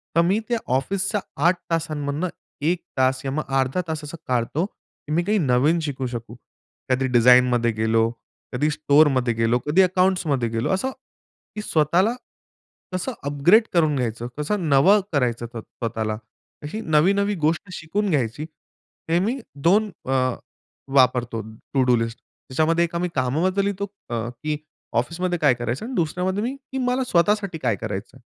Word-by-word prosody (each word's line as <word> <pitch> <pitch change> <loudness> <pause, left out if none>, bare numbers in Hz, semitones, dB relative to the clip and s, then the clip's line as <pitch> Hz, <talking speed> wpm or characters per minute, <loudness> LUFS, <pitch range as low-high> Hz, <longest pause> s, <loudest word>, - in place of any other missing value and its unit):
तर 170 - +6
मी 190 +5 +2
त्या 235 - +2 0.2
ऑफिसच्या 195 +9 -1 0.2
8 175 +1 +4
तासांमधनं 155 0 -1 0.4
1 180 - -3
तास 130 0 +2
या 135 - -1
मग 155 +2 -1 0.2
अर्धा 135 +7 0
तास 160 -1 -4
असं 150 +3 -7
काढतो, 125 +7 0
की 155 - -15
मी 170 +2 +2
काही 210 +4 +1
नवीन 145 +2 +3
शिकू 135 -4 -3
शकू. 115 -2 -7 0.5
कधी 130 +1 +2
डिझाइनमध्ये 125 -1 +5
गेलो, 110 +1 +2 0.4
कधी 145 +5 +1
स्टोअरमध्ये 145 -5 +3
गेलो, 115 +2 +1
कधी 160 +6 +4
अकाउंट्समध्ये 180 -9 +2
गेलो. 115 +1 -1
असं 225 +8 -1 0.6
की 210 - -3
स्वतःला 175 +4 +2 0.8
कसं 185 +8 -2
अपग्रेड 145 +10 +4
करून 155 -4 +3
घ्यायचं, 120 -2 -2
कसं 170 +4 -1
नवं 175 +10 +6
करायचं 120 -4 0 0.2
स्वतःला. 110 -2 -4 0.5
अशी 210 +10 -5
नवी-नवी 200 +5 +2
गोष्ट 165 +5 0
शिकून 195 +6 -2
घ्यायची. 140 -2 0 0.7
हे 170 - +3
मी 225 +8 0 0.3
2 210 +4 +4 0.2
अ, 130 - -3 0.8
वापरतो 125 -3 +3 0.3
टू 135 -2 +3
डू 125 -1 +4
लिस्ट. 115 0 -2
त्याच्यामध्ये 160 +5 -1
एक 170 - -8 0.2
कामाबद्दल 160 +10 +1
लिहितो 200 0 -1 0.2
अ, 115 0 -2
की 150 +5 -4 0.4
ऑफिसमध्ये 175 +5 -3
काय 145 -5 +5
करायचं 120 - -3
आणि 255 - -6
दुसऱ्यामध्ये 180 +4 0
मी 265 +1 -5
मला 250 +1 +1
स्वतःसाठी 200 -3 +1
काय 125 -8 0
करायचं 110 +3 -6
आहे. 130 - -21
150 Hz, 150 wpm, -23 LUFS, 125-185 Hz, 0.8 s, तर